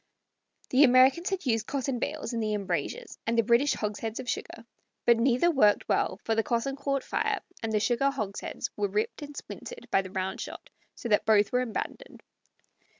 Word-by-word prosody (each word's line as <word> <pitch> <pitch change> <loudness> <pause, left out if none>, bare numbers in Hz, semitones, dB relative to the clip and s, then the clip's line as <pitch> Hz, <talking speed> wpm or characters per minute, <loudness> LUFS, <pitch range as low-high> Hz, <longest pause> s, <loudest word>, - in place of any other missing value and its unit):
The 265 +3 +6
Americans 260 +7 +5
had 385 -4 -3
used 225 -3 +1
cotton 270 -2 -2
bales 290 -2 -3
in 230 - -1
the 215 -1 0
embrasures, 210 - -3
and 230 +1 +1
the 230 - +5
British 240 +6 +3
hogsheads 215 +1 -3
of 260 - -6
sugar; 230 -1 -4 0.4
but 235 -1 +6
neither 255 +8 +3
worked 210 -9 +3
well, - - +1
for 225 - 0
the 225 - +2
cotton 235 +4 -1
caught 275 -1 -1
fire - - 0 0.2
and 225 -1 -2
the 215 - +2
sugar 240 +6 +2
hogsheads 215 -8 -4
were 205 -1 0
ripped 210 +8 -2
and 290 -1 -8
splintered - - -8
by 195 - +4
the 190 - -9
roundshot, 190 0 -5 0.2
so - - -6
that 210 0 +2
both 210 -2 +4
were 250 - +2
abandoned. 255 - -5
235 Hz, 185 wpm, -28 LUFS, 215-275 Hz, 0.4 s, The